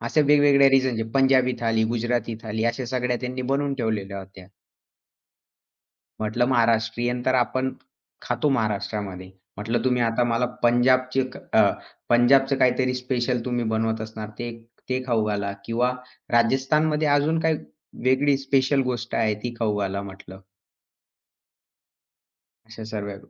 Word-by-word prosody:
अशा 120 +7 +1
वेगवेगळ्या 145 -1 +5
रिजनचे. 130 -4 +2
पंजाबी 130 -1 +4
थाली, 115 -1 +1
गुजराती 120 -1 -1
थाली 110 0 -3
अशा 130 - -5
सगळ्या 125 -1 -1
त्यांनी 130 0 -4
बनवून 140 0 0
ठेवलेल्या 105 -5 -3
होत्या. 95 -1 -12 1.7
म्हटलं 110 +3 0
महाराष्ट्रीयन 120 0 +1
तर 130 - +3
आपण 130 +1 0 0.5
खातो 150 - -1
महाराष्ट्रामध्ये. 100 -5 -2 0.3
म्हटलं 115 +3 -2
तुम्ही 125 -1 +2
आता 115 +1 +1
मला 120 +1 +1 0.2
पंजाबची 130 +2 +3
एक 130 -1 -4
अ, - - +2 0.4
पंजाबचं 135 +3 +4
काहीतरी 130 0 +2
स्पेशल 125 -1 -1
तुम्ही 120 -1 -1
बनवत 110 0 -1
असणार 110 -1 -6
ते 120 0 -4 0.4
ते 130 0 -1
खाऊ 115 -3 +1
घाला 100 -1 -2
किंवा 120 +3 0 0.4
राजस्थानमध्ये 150 +6 +2
अजून 145 +3 +2
काही 160 -2 +1 0.5
वेगळी 135 +2 +3
स्पेशल 135 0 +1
गोष्ट 120 -2 -4
आहे 110 -2 +1
ती 120 -1 -4
खाऊ 110 -3 0
घाला 100 0 -2
म्हटलं. 95 -1 -11 2.3
अशा 110 0 -10
सर्व 100 -2 -5
120 Hz, 130 wpm, -24 LUFS, 110-130 Hz, 2.3 s, वेगवेगळ्या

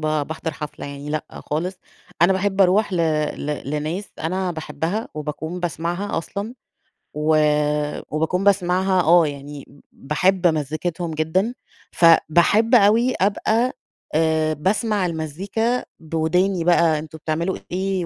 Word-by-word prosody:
باحضر 155 +1 -2
حفلة 150 -1 -7
يعني 140 +1 -7
لأ 155 -1 -2 0.2
خالص، 175 +6 -2 0.5
أنا 185 +3 +6
باحب 195 +1 0
أروح 195 +3 +4
ل 180 - 0 0.4
ل 145 -1 -4
لناس 155 +6 -2
أنا 185 +3 -2
باحبها 160 +6 -3
وباكون 160 +3 -5
باسمعها 175 +3 -2
أصلًا 200 +7 -5 0.6
و 155 +1 +1 0.8
وباكون 170 +5 0
باسمعها 185 -1 +2
آه، 170 0 +5
يعني 145 0 -8
ب 140 - -19
باحب 180 +6 +1
مزيكتهم 160 +2 -2
جدًا، 160 +9 0 0.4
فباحب 175 +7 +4
أوي 230 +4 +4
أبقى 220 +5 +1 0.4
آآ 160 -1 +2
باسمع 200 +5 0
المزيكا 190 +9 -2 0.2
بوداني 165 +3 0
بقى 165 -2 +3
أنتم 155 0 -9
بتعملوا 160 +4 -2
إيه 190 -1 -1
170 Hz, 120 wpm, -22 LUFS, 155-190 Hz, 0.8 s, أنا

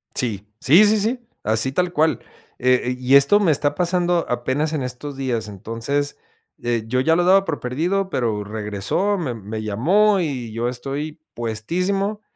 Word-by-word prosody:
Sí, 105 -5 -2
sí, 170 +11 +6
sí, 215 +1 +5
sí 230 +5 0 0.2
así 110 +4 +2
tal 180 +4 0
cual. 155 -5 +1 0.4
Eh 125 0 +3
eh 125 +1 -1
y 130 +2 +3
esto 140 +9 +6
me 180 -6 +3
está 145 0 +1
pasando 175 -1 +1
apenas 130 +6 -1
en 155 - -1
estos 130 +3 -5
días, 120 -5 -2
entonces, 115 +8 -3 0.5
eh, 120 -2 0
yo 125 +3 +1
ya 160 +5 +3
lo 175 - +2
daba 195 +2 +5
por 160 -6 -3
perdido, 175 +10 -1
pero 110 - -1
regresó, 105 - -2
mem 125 - -4
me 110 +2 -5
llamó 185 - +2
y 130 -8 -4
yo 115 +2 -1
estoy 140 +5 -5
puestísimo 180 - -2
135 Hz, 170 wpm, -21 LUFS, 115-175 Hz, 0.5 s, sí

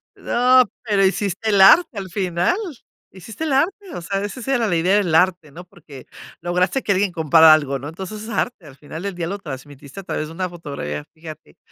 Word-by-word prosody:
No, 255 +1 +3 0.2
pero 205 -4 +2
hiciste 195 +2 -1
el 200 -2 +2
arte 235 - +6
al 195 -1 -5
final, 180 - 0 0.5
hiciste 205 - -9
el 315 - -2
arte, 310 +8 +2 0.2
o - - -6
sea, 195 +3 -3
esa 205 +5 -6
sí 255 - -7
era 240 -4 +1
la 175 - 0
idea 180 +4 +2
del 185 -6 0
arte, 175 -2 +2
¿no? 175 +5 -11
Porque 155 -8 -14 0.4
lograste 180 +8 0
que 200 - +1
alguien 195 0 0
comprara 160 -1 +6
algo, 140 -3 0
¿no? 140 +3 -7
Entonces, 190 +6 -8
es 220 - -9
arte, 235 -5 -3
al 140 -2 -14
final 155 +4 -9
del 200 -1 -3
día 170 -1 -4
lo 200 +3 -5
transmitiste 140 0 -10
a - - -8
través 155 -3 -4
de 160 - -11
una 185 +2 -3
fotografía. 140 - -6
Fíjate, 155 - -12
180 Hz, 215 wpm, -20 LUFS, 160-205 Hz, 0.5 s, arte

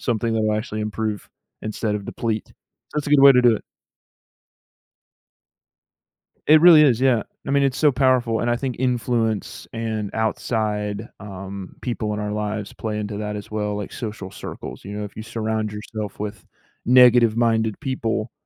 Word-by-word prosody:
something 115 -1 -1
that 110 - +1
will 110 0 +1
actually 110 -1 -4
improve 105 -1 -3 0.3
instead 110 0 -2
of 100 - -4
deplete. 110 0 -3 0.4
That's 150 -1 -2
a 145 - -3
good 145 -2 +6
way 140 0 +9
to 125 - +4
do 120 -2 +6
it. - - -10 2.9
It 155 +1 +7
really 170 -3 +9
is, 130 -6 +4
yeah. 130 -4 +3 0.3
I - - -1
mean, 140 0 +3
it's 135 -2 +1
so 150 -2 +4
powerful, 125 -4 +2
and 120 - 0
I 120 - +2
think 130 0 -3
influence 120 -4 -1
and 110 -3 -3
outside, 110 -1 -1
um, 95 -1 -8
people 110 -4 -2
in 105 - -3
our 105 0 -3
lives 105 -1 -3
play 105 -1 -4
into 105 0 -4
that 105 0 -4
as 105 0 -8
well, 105 -1 -2
like 105 - -5
social 105 -4 -6
circles, - - -8
you 100 - -7
know, 105 0 -4
if 105 - -8
you 110 - -6
surround 110 -1 -2
yourself 105 0 -6
with 105 -3 -6 0.4
negative-minded 115 -3 +4
people, 115 -4 -2
110 Hz, 170 wpm, -22 LUFS, 105-120 Hz, 2.9 s, way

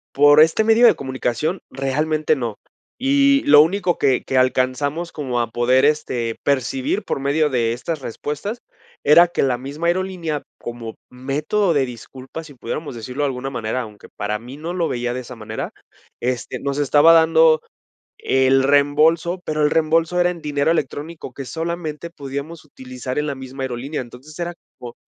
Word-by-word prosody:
Por 145 +1 +6
este 160 +7 +5
medio 225 +2 +6
de - - +5
comunicación 130 +6 -2
realmente 150 +3 0
no. 115 -4 -4 0.4
Y 275 +1 +3
lo 145 0 +8
único 180 +2 +1
que 135 -3 +2
que 130 - -1
alcanzamos 130 +6 0
como 130 -5 -2
a 115 - -2
poder, 125 +3 +3
este, 125 -6 0
percibir 265 - -1
por - - -3
medio 145 +3 +1
de 120 -4 0
estas 155 +6 -4
respuestas, 150 - -5 0.4
era 170 +4 +7
que 175 - -1
la 130 -3 +1
misma 145 +6 -4
aerolínea, 175 -4 -2
como 120 -2 -7 0.2
método 150 +10 0
de 140 -3 +2
disculpas, 130 +6 -9
si 145 - -13
pudiéramos 130 +3 -6
decirlo 125 +5 -4
de - - +2
alguna 135 0 -4
manera, 125 -1 -3
aunque 105 -3 -11
para 105 +1 -4
mí 125 +4 -10
no 160 +4 -5
lo 175 -3 0
veía 120 0 -2
de 125 - -3
esa 125 0 -9
manera, 110 -2 -6 0.5
este, 125 -2 -3
nos 140 0 -2
estaba 145 +3 +5
dando 160 -1 +5 0.6
el 135 0 +3
reembolso, 150 +5 +3
pero, 155 -1 -1
el 150 - +4
reembolso 165 +2 +2
era 175 - +3
en 170 - -9
dinero 145 +1 0
electrónico 150 -2 -4
que 135 - -6
solamente 165 +1 -4
podíamos 145 +2 -7
utilizar 130 -1 -6
en 150 - -1
la 140 - -3
misma 130 0 -7
aerolínea, 130 +4 -4
entonces 130 +6 -12
era 175 0 -3 0.3
como 120 -2 -9
145 Hz, 170 wpm, -20 LUFS, 130-165 Hz, 0.6 s, lo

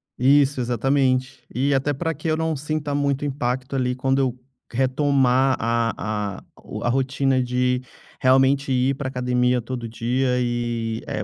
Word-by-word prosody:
Isso, 140 +1 +3
exatamente. 130 +2 0
E 140 +3 +1
até 135 +2 +1
pra 165 +4 -2
que 155 +2 -6
eu 155 - +1
não 160 -1 -1
sinta 150 0 -3
muito 140 0 0
impacto, 130 -1 -2
ali, 125 -1 0
quando 135 +1 +1
eu 130 -2 0 0.3
retomar 130 0 +2
a 110 -3 -1
a - - -20 0.2
o - - -7
a - - +1
rotina 135 +1 +1
de 125 0 0 0.4
realmente 135 +1 +3
ir 130 +1 +2
pra 140 0 -4
academia 125 -1 +1
todo 120 0 -5
dia 125 +3 0
e 120 -2 -2
eh, - - -3
130 Hz, 155 wpm, -23 LUFS, 125-140 Hz, 0.4 s, Isso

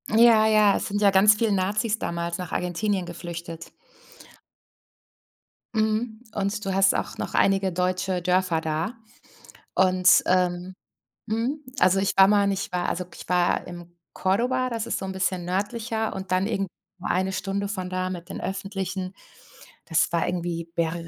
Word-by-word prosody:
Ja, 225 -1 +6
ja, 215 -2 +5
es - - -3
sind 205 +1 -2
ja 205 - +6
ganz 195 +2 +6
viel 220 0 +1
Nazis 205 +3 0
damals 170 0 -3
nach 180 -3 -6
Argentinien 185 +2 -1
geflüchtet. 170 -1 -7 2.0
Mhm. 220 +1 0
Und 205 0 -2
du 195 - -1
hast 195 0 +4
auch - - -3
noch - - -5
einige 195 -1 +2
deutsche 185 +1 -1
Dörfer 180 -2 +1
da. 160 +7 -2 0.8
Und, 185 -1 +5
ähm 180 0 0 0.5
Mhm. 235 +7 -2 0.2
Also, 185 +1 +4
ich 195 - +1
war 190 0 +8
mal 205 0 +4
und 200 - +2
ich 185 -2 -4
war 180 - 0
also, 180 +1 -3
ich - - -11
war 180 -1 +2
im 175 -1 -10 0.2
Córdoba. 250 +7 0
Das 230 -2 -3
ist - - -1
so - - -5
'n 190 - -4
bisschen 185 -2 -1
nördlicher 220 +4 -2
und 190 -1 -4
dann 185 +2 +2
irgend 195 -3 -1 0.3
1 185 +1 0
Stunde 195 +1 -2
von 185 -3 -4
da 185 0 -2
mit 175 -2 -6
den - - -7
Öffentlichen. 190 -1 -4 0.7
Das 165 -3 +1
war 170 -1 +1
irgendwie 170 -1 -3
Ber 165 -1 0
190 Hz, 160 wpm, -25 LUFS, 180-210 Hz, 2.0 s, war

